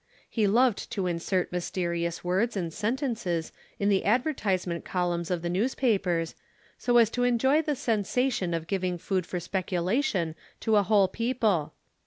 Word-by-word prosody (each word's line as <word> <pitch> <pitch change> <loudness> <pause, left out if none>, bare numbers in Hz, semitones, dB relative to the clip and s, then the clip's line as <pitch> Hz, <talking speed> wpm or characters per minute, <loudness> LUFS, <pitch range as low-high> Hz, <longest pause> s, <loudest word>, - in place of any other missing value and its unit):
He 215 -3 +1
loved 235 +2 +2
to 195 - -1
insert 180 +2 -1
mysterious 170 -1 -2
words 195 +6 0
and 170 -4 -3
sentences 220 - -2 0.3
in 200 - 0
the 195 -2 +2
advertisement 200 - 0
columns 175 -2 -1
of 175 -2 -1
the - - -1
newspapers, 190 -5 +1 0.4
so 245 -1 +2
as 230 -2 +5
to 245 - 0
enjoy 265 +5 +3
the 300 -2 -1
sensation 220 -4 0
of 165 -1 -3
giving 185 -1 -1
food 185 0 -2
for 180 - -3
speculation 185 - -1 0.3
to 220 - +2
a - - +6
whole 200 -1 +4
people. 220 - 0
195 Hz, 150 wpm, -28 LUFS, 175-235 Hz, 0.4 s, a